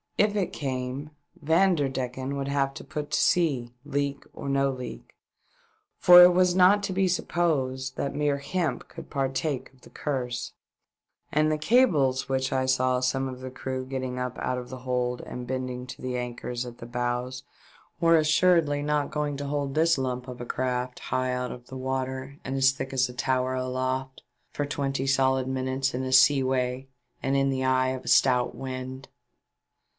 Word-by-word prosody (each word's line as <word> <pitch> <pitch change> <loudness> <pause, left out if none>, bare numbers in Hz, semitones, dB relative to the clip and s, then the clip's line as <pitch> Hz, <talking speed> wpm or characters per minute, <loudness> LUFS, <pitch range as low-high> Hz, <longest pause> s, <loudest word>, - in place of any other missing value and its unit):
If 210 0 +3
it 195 -3 -1
came, 130 +1 -4 0.3
Vanderdecken 140 -6 +1
would 140 0 -3
have 140 -1 0
to - - -8
put 150 -2 -6
to - - +2
sea, 135 -9 +2
leak 140 -1 -2
or 140 - -6
no 140 0 +2
leak, 125 -3 -8 0.8
for 180 0 +9
it 180 0 +7
was 180 0 +3
not 190 +3 +5
to 190 - -2
be 190 0 +2
supposed 140 -7 -1
that 140 - -2
mere 145 -1 +1
hemp 155 -1 -2
could - - -11
partake 135 +1 -2
of 130 - -25
the - - -15
Curse; 125 -4 -3 0.8
and 155 +1 +2
the 155 - +1
cables 150 - +3
which 130 0 0
I 130 0 0
saw 130 -1 +2
some 135 +1 0
of 130 -1 -7
the 130 - -5
crew 130 0 -4
getting 130 -1 -4
up 125 -1 -3
out 130 - -1
of 125 - -9
the 130 - -7
hold 125 -1 -1
and 125 0 -7
bending 130 -1 -3
to - - -9
the 125 -1 -3
anchors 125 0 -4
at 120 -1 -10
the 115 - -8
bows 125 +1 -2 0.6
were 165 0 +5
assuredly 155 -1 +3
not 150 -1 0
going 150 -2 -2
to 145 - -4
hold 140 -1 -2
this 165 +1 +3
lump 125 -1 -3
of 125 -1 -8
a - - -5
craft, 125 0 -2
high 130 0 -1
out 125 0 -2
of 125 0 -11
water 130 +1 -4
and 135 - -4
as 135 0 +5
thick 135 -1 -6
as 130 -1 +2
a - - -8
tower 130 +1 0
aloft, 130 +1 -2 0.3
for 145 - -2
twenty 140 -1 -2
solid 130 -1 +2
minutes 130 0 -1
in 130 +1 -2
a 130 0 -2
seaway 130 -1 +3 0.3
and 135 +1 0
in 135 0 +2
the 130 -1 -1
eye 130 0 +2
of 130 0 -5
a - - -10
stout 125 -2 +3
wind. 130 0 -6
130 Hz, 180 wpm, -27 LUFS, 130-145 Hz, 0.8 s, for